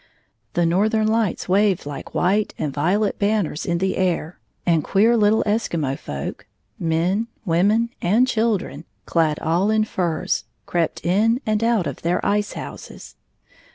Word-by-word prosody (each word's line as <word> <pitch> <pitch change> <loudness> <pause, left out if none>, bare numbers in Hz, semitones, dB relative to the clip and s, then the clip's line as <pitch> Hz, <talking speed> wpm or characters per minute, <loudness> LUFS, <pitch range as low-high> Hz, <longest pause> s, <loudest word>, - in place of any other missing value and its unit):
The 175 - +2
northern 215 +6 +2
lights 220 -3 0
waved 195 -2 +2
like 145 -1 -7
white 200 +4 +1
and 145 -3 -3
violet 190 +8 0
banners 200 -7 0
in 170 - +1
the 190 +2 -1
air, 180 -3 -1 0.3
and 165 -3 +2
queer 220 +4 +3
little 215 0 +3
Eskimo 170 - -1
folk 70 - -6 0.2
— - - -47
men, 175 +7 0 0.2
women, 205 +7 +2
and 220 +9 +3
children 215 - -1
— - - -45
clad 160 -3 +1
all 175 +5 +1
in 220 0 +3
furs, 175 -6 -1 0.2
crept 170 -2 -2
in 215 +7 +3
and 215 0 0
out 230 -6 +2
of - - -5
their 170 +2 0
ice 205 0 0
houses. - - -9
190 Hz, 155 wpm, -22 LUFS, 170-215 Hz, 0.3 s, queer